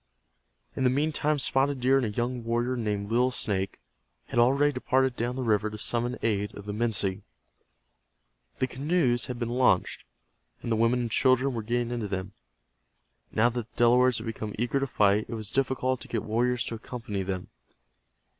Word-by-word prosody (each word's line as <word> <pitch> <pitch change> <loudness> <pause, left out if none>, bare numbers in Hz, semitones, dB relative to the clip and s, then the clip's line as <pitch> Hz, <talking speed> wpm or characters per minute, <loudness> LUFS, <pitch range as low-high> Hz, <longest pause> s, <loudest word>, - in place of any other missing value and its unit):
In 130 - -1
the 125 - +5
meantime 150 +2 +1
Spotted 135 0 +1
Deer 130 +2 +4
and 135 - +1
a - - -2
young 120 +3 -2
warrior 120 +2 0
named 105 -3 -2
Little 125 +2 +3
Snake 100 -6 -1 0.5
had 120 - 0
already 140 +5 +4
departed 130 -1 +1
down 120 +2 -2
the 130 - -3
river 110 -2 +1
to 105 - -8
summon 120 +3 -1
aid 105 -2 0
of 100 - -9
the 105 - -4
Minsi. 105 -3 0 1.4
The - - +1
canoes 135 -2 0
had 125 - -4
been 120 -1 -3
launched, 125 +1 +1 0.6
and 120 - -3
the - - +3
women 115 +2 +2
and 120 -2 -3
children 130 +2 +3
were 115 - -2
getting 120 +2 -1
into 120 -3 -2
them. 95 0 -4 1.0
Now 115 +3 +3
that 120 -1 -5
the - - -38
Delawares 125 +1 +4
had 110 - -6
become 110 -2 -5
eager 120 +4 0
to 135 - -1
fight, 105 -3 +2
it 115 - -4
was 110 -1 -2
difficult 130 -1 0
to - - -9
get 115 - -2
warriors 120 +2 +1
to - - -4
accompany 115 -3 -5
them. 95 -1 -4
120 Hz, 185 wpm, -27 LUFS, 110-130 Hz, 1.4 s, the